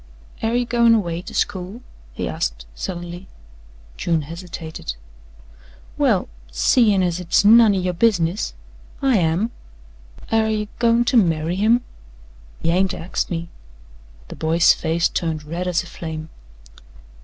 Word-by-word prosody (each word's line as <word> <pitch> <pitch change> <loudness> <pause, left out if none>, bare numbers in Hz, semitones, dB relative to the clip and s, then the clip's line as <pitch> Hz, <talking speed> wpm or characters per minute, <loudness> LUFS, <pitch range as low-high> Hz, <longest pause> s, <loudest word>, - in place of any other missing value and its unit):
"Air 225 +1 0
ye 245 0 +1
goin' 235 -1 +4
away 175 -5 -1
to - - -10
school?" 190 +6 -2 0.3
he - - -4
asked - - -3
suddenly. 175 - -6 0.7
June 165 -3 0
hesitated. 165 - -7 1.0
"Well, - - +2 0.2
seein' 195 - +3
as 175 -1 0
hit's 180 +3 +2
none 220 -1 +7
o' - - 0
yo' 180 -1 -1
business 180 -2 +1 0.5
I 265 -4 +4
am." 175 +6 +1 0.8
"Air 220 -1 +3
ye 210 -1 -2
goin' 235 0 +3
to 250 - +3
marry 165 -4 +2
him?" 220 +5 +3 0.8
"He 165 - +2
ain't 185 +1 +1
axed 175 - -3
me." 170 -1 -4 0.8
The - - -8
boy's 165 +1 +4
face 165 +1 0
turned 160 -3 -3
red 170 +4 -4
as 180 0 +1
a - - -13
flame. 160 -2 -7
180 Hz, 135 wpm, -21 LUFS, 165-220 Hz, 1.0 s, none